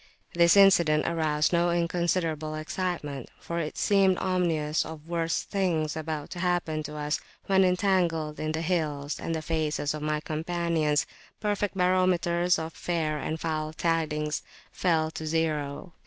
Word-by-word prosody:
This 170 Hz, +2 st, +5 dB
incident 170 Hz, -6 st, +5 dB
aroused 155 Hz, -1 st, +1 dB
no 170 Hz, 0 st, +3 dB
inconsiderable 170 Hz, -2 st, 0 dB
excitement, 155 Hz, -4 st, -4 dB
for 170 Hz, 0 st, -4 dB
it 155 Hz, -2 st, -4 dB
seemed 195 Hz, -3 st, +3 dB
ominous 165 Hz, -5 st, 0 dB
of 160 Hz, -1 st, -9 dB
worse 165 Hz, -1 st, -1 dB
things 170 Hz, -6 st, -1 dB
about 155 Hz, -2 st, -4 dB
to 175 Hz, -, -6 dB
happen 175 Hz, -3 st, 0 dB
to 150 Hz, 0 st, -7 dB
us 150 Hz, +1 st, -1 dB, 0.3 s
when 190 Hz, -1 st, +4 dB
entangled 180 Hz, -5 st, +1 dB
in 155 Hz, 0 st, -1 dB
the 160 Hz, +1 st, -2 dB
hills, 150 Hz, -4 st, -1 dB
and 165 Hz, -, -2 dB
the 160 Hz, -, -4 dB
faces 155 Hz, -2 st, -1 dB
of 150 Hz, -, -5 dB
my 150 Hz, 0 st, 0 dB
companions, 160 Hz, -1 st, 0 dB, 0.3 s
perfect 205 Hz, -2 st, -1 dB
barometers 180 Hz, -1 st, +2 dB
of 160 Hz, 0 st, -5 dB
fair 160 Hz, -3 st, -1 dB
and 160 Hz, +2 st, -3 dB
foul 155 Hz, -1 st, -2 dB
tidings, 155 Hz, -2 st, -1 dB, 0.3 s
fell 160 Hz, -3 st, +1 dB
to 160 Hz, 0 st, -6 dB
zero. 155 Hz, 0 st, -1 dB
165 Hz, 145 wpm, -27 LUFS, 155-175 Hz, 0.3 s, This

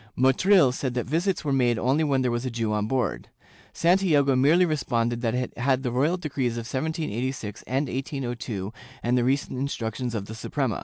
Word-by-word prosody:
Motril 135 Hz, +4 st, +5 dB
said 130 Hz, -1 st, -3 dB
that 125 Hz, -, -1 dB
visits 170 Hz, +6 st, -1 dB
were 140 Hz, -, +1 dB
made 120 Hz, -3 st, +2 dB
only 135 Hz, +7 st, +2 dB
when 135 Hz, -3 st, +1 dB
there 125 Hz, -, +1 dB
was 120 Hz, +1 st, -2 dB
a 130 Hz, -, -2 dB
Jew 115 Hz, -2 st, -2 dB
on 105 Hz, 0 st, 0 dB
board. 130 Hz, +1 st, -1 dB, 0.4 s
Santiago 165 Hz, -6 st, +3 dB
merely 155 Hz, +8 st, +5 dB
responded 120 Hz, -7 st, -1 dB
that 115 Hz, -1 st, 0 dB
it 125 Hz, 0 st, -3 dB
had 130 Hz, +1 st, +1 dB
the 125 Hz, -, -1 dB
royal 145 Hz, +9 st, +1 dB
decrees 140 Hz, -8 st, -2 dB
of 115 Hz, -1 st, -5 dB
1786 130 Hz, -, -3 dB
and 135 Hz, +3 st, 0 dB
1802 120 Hz, -6 st, -4 dB, 0.3 s
and 120 Hz, +1 st, +2 dB
the 125 Hz, -, +2 dB
recent 130 Hz, 0 st, 0 dB
instructions 120 Hz, -3 st, -3 dB
of 100 Hz, -3 st, -3 dB
the 110 Hz, -, -8 dB
Suprema. 115 Hz, 0 st, -2 dB
130 Hz, 190 wpm, -26 LUFS, 120-145 Hz, 0.4 s, Motril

